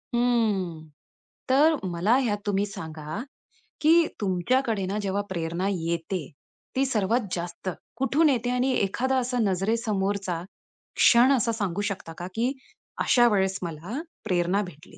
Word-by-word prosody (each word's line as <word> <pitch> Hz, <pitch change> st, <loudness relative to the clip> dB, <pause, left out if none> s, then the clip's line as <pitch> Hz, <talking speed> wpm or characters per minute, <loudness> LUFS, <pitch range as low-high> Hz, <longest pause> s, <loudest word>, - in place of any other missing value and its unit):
हं. 205 Hz, -10 st, +1 dB, 0.6 s
तर 300 Hz, +5 st, +5 dB
मला 180 Hz, +8 st, +2 dB
ह्यात 225 Hz, -6 st, +1 dB
तुम्ही 205 Hz, 0 st, +1 dB
सांगा, 160 Hz, -2 st, -6 dB, 0.6 s
की 325 Hz, +1 st, +5 dB
तुमच्याकडे 205 Hz, +3 st, +1 dB
ना 195 Hz, +3 st, -2 dB
जेव्हा 200 Hz, 0 st, -1 dB
प्रेरणा 170 Hz, +1 st, -2 dB
येते, 170 Hz, 0 st, -2 dB, 0.5 s
ती 270 Hz, +1 st, +2 dB
सर्वात 230 Hz, -1 st, +1 dB
जास्त 175 Hz, +2 st, -5 dB, 0.3 s
कुठून 290 Hz, +4 st, +3 dB
येते? 245 Hz, -2 st, +1 dB
आणि 250 Hz, +1 st, +1 dB
एखादा 255 Hz, +5 st, +1 dB
असा 250 Hz, 0 st, -1 dB
नजरेसमोरचा 195 Hz, -3 st, 0 dB, 0.5 s
क्षण 245 Hz, +3 st, +6 dB
असा 230 Hz, 0 st, +1 dB
सांगू 200 Hz, -3 st, -2 dB
शकता 165 Hz, -4 st, -7 dB
का 175 Hz, 0 st, -5 dB
की 240 Hz, +4 st, +1 dB, 0.5 s
अशा 240 Hz, -1 st, +5 dB
वेळेस 190 Hz, -1 st, +1 dB
मला 170 Hz, -, -5 dB, 0.3 s
प्रेरणा 180 Hz, 0 st, +1 dB
भेटली? 155 Hz, -4 st, -12 dB
200 Hz, 130 wpm, -26 LUFS, 180-245 Hz, 0.6 s, क्षण